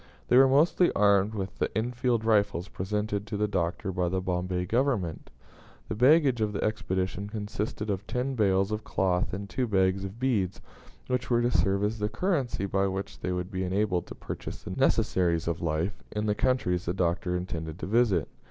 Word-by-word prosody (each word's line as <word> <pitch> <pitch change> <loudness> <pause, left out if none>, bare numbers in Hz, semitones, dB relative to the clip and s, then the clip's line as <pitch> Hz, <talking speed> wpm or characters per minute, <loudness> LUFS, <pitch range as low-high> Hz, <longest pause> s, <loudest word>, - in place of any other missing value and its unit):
They 125 - +6
were 135 +1 +8
mostly 155 +6 +4
armed 100 +1 +3
with 95 -2 -5
the - - +1
Enfield 120 0 0
rifles 100 -5 +2
presented 105 +2 -2
to 105 - -3
the 105 +1 +1
Doctor 90 -1 -1
by 90 -1 0
the 95 +1 0
Bombay 90 0 -2
Government. 110 - -1 0.6
The - - -1
baggage 130 +1 +4
of 105 -1 0
the - - -2
expedition 100 -2 -2
consisted 105 0 -3
of 100 +2 -4
ten 125 +3 -1
bales 100 -3 +2
of 105 0 -2
cloth 90 -1 0
and 100 +2 -5
two 125 +4 -1
bags 95 -2 +2
of 100 +4 -7
beads, 110 -8 0 0.5
which 125 0 -2
were 120 -1 +3
to 120 - +2
serve 100 -3 +2
as 105 +2 -1
the 105 0 0
currency 140 - -1
by 100 0 +1
which 95 +1 -5
they 90 - -2
would 90 +1 -3
be 95 0 -2
enabled 95 -1 0
to - - -8
purchase - - -7
the - - -6
necessaries 85 -3 +1
of 85 -1 -1
life 85 +3 -1
in 105 0 -2
the 105 - +2
countries 100 -7 0
the 90 - -1
Doctor 90 0 0
intended 80 -3 -5
to - - -5
visit. 105 -6 +2
100 Hz, 190 wpm, -28 LUFS, 90-110 Hz, 0.6 s, were